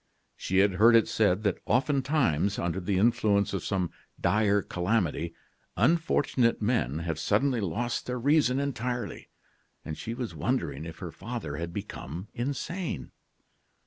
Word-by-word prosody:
She 95 - -2
had 100 +1 +5
heard 115 +1 +8
it 115 - +5
said 105 -1 +2
that 100 -4 0
oftentimes, 130 - +2
under 85 +2 -1
the 95 +1 -1
influence 100 -2 +2
of 95 - -2
some 95 -4 -1 0.3
dire 105 -2 +2
calamity, 90 -3 -1 0.4
unfortunate 145 -7 +2
men 105 - 0
have 80 -2 -2
suddenly 115 - +1
lost 115 +6 -2
their 125 0 -2
reason 135 0 +3
entirely; 125 -3 -3 0.6
and 80 - -4
she 115 +7 -5
was 120 -8 -4
wondering 75 -1 -2
if 80 -1 -8
her 85 - -6
father 95 -4 -5
had 85 +1 -4
become 95 -2 -6
insane. 145 - -3
105 Hz, 140 wpm, -28 LUFS, 90-125 Hz, 0.6 s, heard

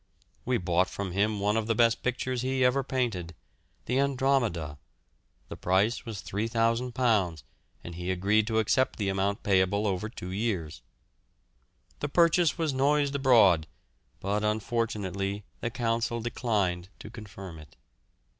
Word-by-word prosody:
We 125 0 +1
bought 90 -1 +1
from 100 -2 -4
him 105 +3 +1
one 105 +1 +1
of 110 -1 0
the 115 - +1
best 115 0 +3
pictures 125 0 -2
he 130 0 +1
ever 135 +2 +2
painted, 115 -11 -2 0.5
the 125 +3 0
"Andromeda"; 125 - 0 0.7
the - - -7
price 95 +6 +1
was 105 -4 -6
£3,000, 115 - 0 0.4
and 85 - -7
he 90 +2 -5
agreed 100 +4 +2
to 110 -1 0
accept 110 +4 +2
the 100 -3 -1
amount 100 +1 -1
payable 100 +1 +2
over 100 +1 -1
two 90 -5 -8
years. 95 - -2 1.2
The 145 - -2
purchase 170 +1 +3
was 160 -4 0
noised 140 +1 +2
abroad, 115 - +5 0.5
but 100 +2 -1
unfortunately 105 -2 -2 0.2
the 120 - -2
Council 115 0 -1
declined 100 -6 -1
to 105 - -10
confirm 95 -7 -9
it. 75 - -15
110 Hz, 135 wpm, -28 LUFS, 95-125 Hz, 1.2 s, abroad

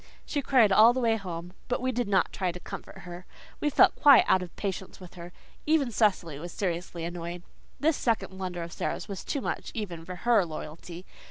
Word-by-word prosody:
She 290 - -2
cried 255 -6 +4
all 220 +4 +7
the 260 - -1
way 230 -2 +2
home, 175 -4 -6
but 245 - -1
we 255 +1 0
did 245 -2 -1
not 190 -3 +1
try 185 -2 -1
to 180 - -9
comfort - - -9
her. 180 0 -10 0.3
We 295 - +1
felt - - +5
quite 280 -4 +7
out 185 - +4
of 180 -1 -8
patience 190 -2 -5
with 180 -2 -12
her. 175 0 -10 0.4
Even 300 -5 +2
Cecily 185 -9 +1
was 175 +2 -7
seriously 175 -2 -3
annoyed. 170 0 -5 0.4
This 310 0 +2
second 225 -5 -1
blunder 180 -2 -4
of 170 - -8
Sara's - - -3
was 195 -2 -6
too 280 - -3
much - - -3
even 180 -7 -5
for 180 +2 -7
her 235 -5 +5
loyalty. 170 +2 -8
190 Hz, 205 wpm, -28 LUFS, 175-235 Hz, 0.4 s, all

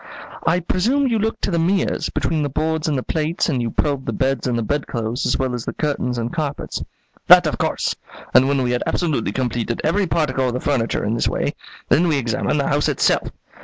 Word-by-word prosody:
"I 180 +2 +3
presume 235 +12 +1
you 230 -4 +1
looked 220 +2 -2
to - - 0
the 170 - +1
mirrors, 185 +3 +1
between 160 -2 -1
the 145 - -1
boards 155 +3 -1
and 150 -3 +1
the 130 - -2
plates, 160 +2 -1
and 130 -6 0
you 115 - -1
probed 140 +3 -1
the - - 0
beds 135 -2 0
and 120 -2 0
the 115 - -1
bedclothes, 120 -3 -2
as - - +1
well 130 -1 -1
as 120 -2 -3
the - - -4
curtains 135 -5 -1
and 115 0 -3
carpets." 150 -4 -3 0.5
"That - - +9
of - - -1
course; - - 0 0.4
and 130 - +6
when 140 -1 +1
we 120 - 0
had 125 - 0
absolutely 165 -5 0
completed 120 -2 -2
every 190 +5 +1
particle 135 -6 0
of 120 - -1
the - - -1
furniture 125 -8 0
in 105 - 0
this 115 - 0
way, - - -1 0.4
then 175 +3 +4
we 155 -3 +2
examined 125 +3 0
the 140 - 0
house 145 +1 +2
itself. - - +2
140 Hz, 225 wpm, -21 LUFS, 125-165 Hz, 0.5 s, That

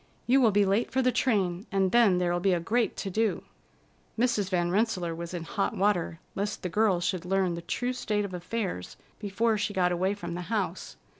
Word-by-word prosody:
You 265 +3 +4
will 235 - +6
be 205 0 +3
late 200 +4 +1
for 265 - +1
the 255 - +3
train, 195 -6 0
and 190 -2 +2
then 225 -6 +5
there'll 175 -1 +1
be 190 +1 +2
a 175 - +1
great 225 +7 0
to 195 - -4
do." 220 +2 0 0.7
Mrs. 230 -5 +1
Van 175 -2 0
Rensselaer 185 -5 0
was 170 +1 -6
in 175 -2 -4
hot 200 +5 -2
water 185 -4 +1
lest 205 +1 -3
the 180 - -2
girl 205 -1 +2
should 180 0 -1
learn 190 -1 +1
the 170 - -5
true 245 +9 -2
state 210 -4 -1
of 190 - -7
affairs 180 - -4 0.2
before 215 +2 0
she 210 0 -2
got 180 -1 +2
away 185 +3 0
from 205 - -6
the 175 - -4
house. 195 -6 -3
195 Hz, 210 wpm, -28 LUFS, 180-220 Hz, 0.7 s, will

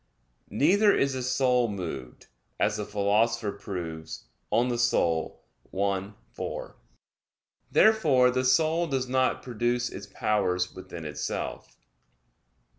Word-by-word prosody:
Neither 195 - +4
is 140 -1 +1
the 130 - -3
soul 125 -1 +2
moved, 85 -11 -6 0.3
as 105 0 +1
the 105 - -3
Philosopher 105 +2 +1
proves 85 -6 -6 0.3
(De - - +3
Anima 120 -9 +1 0.4
i, 100 0 0 0.2
4). - - -6 1.0
Therefore 150 -13 +5
the 130 0 0
soul 160 +6 +3
does 135 -3 -1
not 130 0 +1
produce 120 0 -1
its 100 0 -8
powers 95 -3 0
within 95 -3 -9
itself. 75 -1 -5
120 Hz, 110 wpm, -27 LUFS, 100-130 Hz, 1.0 s, Therefore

